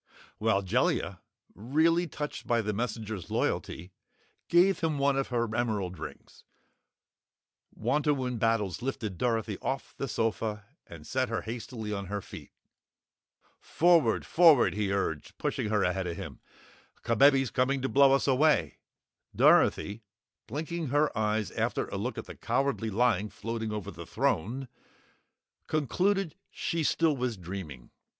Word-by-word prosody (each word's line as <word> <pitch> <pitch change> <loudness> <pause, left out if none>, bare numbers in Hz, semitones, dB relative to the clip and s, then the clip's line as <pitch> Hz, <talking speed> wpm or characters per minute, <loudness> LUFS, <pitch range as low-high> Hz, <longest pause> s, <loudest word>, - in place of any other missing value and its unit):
While 105 -3 +2
Jellia, 95 - 0 0.3
really 160 - +2
touched 150 -1 -6
by 120 -1 +2
the 105 0 -1
messenger's 110 -4 -4
loyalty, 90 +4 -2 0.6
gave 180 +2 +4
him 160 -4 0
one 140 0 +2
of 135 0 0
her 120 -3 -1
emerald 105 -7 -1
rings, 80 - -10 1.3
Wantowin 135 -5 0
Battles 115 -3 0
lifted 110 -8 -4
Dorothy 110 -4 -1
off 135 0 -4
the 135 - -3
sofa 110 -3 -2 0.2
and 80 -3 -11
set 130 -1 -1
her 115 - -2
hastily 115 -1 -5
on 100 -1 -4
her 100 +2 -3
feet. - - -11 1.1
"Forward! 170 -1 +3
Forward!" 155 - +5
he 100 -1 -1
urged, 80 -7 -2
pushing 105 - -2
her 105 -2 +2
ahead 90 0 0
of 85 -1 -4
him. - - -7 0.6
"Kabebe's 135 +2 +4
coming 130 +1 +1
to - - +1
blow 140 0 +5
us 135 - +3
away!" 145 +3 +2 0.6
Dorothy 105 +3 +4 0.5
blinking 160 +6 -4
her 145 +3 +1
eyes 110 -1 0
after - - -1
a - - -4
look - - -3
at - - -5
the - - -9
Cowardly 135 -5 -1
Lion 105 -1 +1
floating 110 +2 -4
over 105 -3 -4
the - - -10
throne 125 +10 -1 1.0
concluded 180 +4 0 0.2
she 165 -1 -2
still 160 0 +2
was 125 -4 -2
dreaming. 85 -9 -8
115 Hz, 135 wpm, -29 LUFS, 105-140 Hz, 1.3 s, Forward